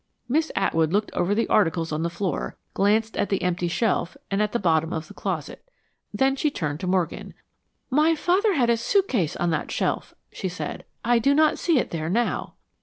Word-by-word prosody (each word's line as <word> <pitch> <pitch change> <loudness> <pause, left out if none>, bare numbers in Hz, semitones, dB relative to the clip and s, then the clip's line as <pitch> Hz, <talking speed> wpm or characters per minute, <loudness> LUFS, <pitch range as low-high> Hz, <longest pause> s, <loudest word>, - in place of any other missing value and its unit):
Miss 310 +6 +1
Atwood 165 -5 +1
looked 210 +2 0
over 185 +4 +1
the 230 - +1
articles 165 -4 +2
on 155 +1 -1
the 170 - 0
floor, 175 +2 -3 0.2
glanced 220 +3 +2
at - - 0
the 195 - 0
empty 180 -1 0
shelf, 185 0 0
and 195 +1 +1
at 210 -1 +1
the - - +1
bottom 165 -4 +1
of 160 -1 -4
the - - -12
closet. 165 -7 -4 0.5
Then 270 0 +2
she 300 +2 +1
turned 155 - -3
to 185 - -4
Morgan. 180 -2 -1 0.6
"My 305 +4 +4
father 375 +5 +2
had 240 -5 +3
a 230 - +2
suitcase 235 - +1
on 175 -1 0
that 155 - -2
shelf," - - -2 0.2
she 190 - -4
said. 180 - -6 0.2
"I 240 0 +4
do 275 +5 +3
not 310 0 +3
see 335 -4 +2
it - - 0
there 160 -1 -3
now." 235 +6 -1
200 Hz, 200 wpm, -24 LUFS, 170-255 Hz, 0.6 s, My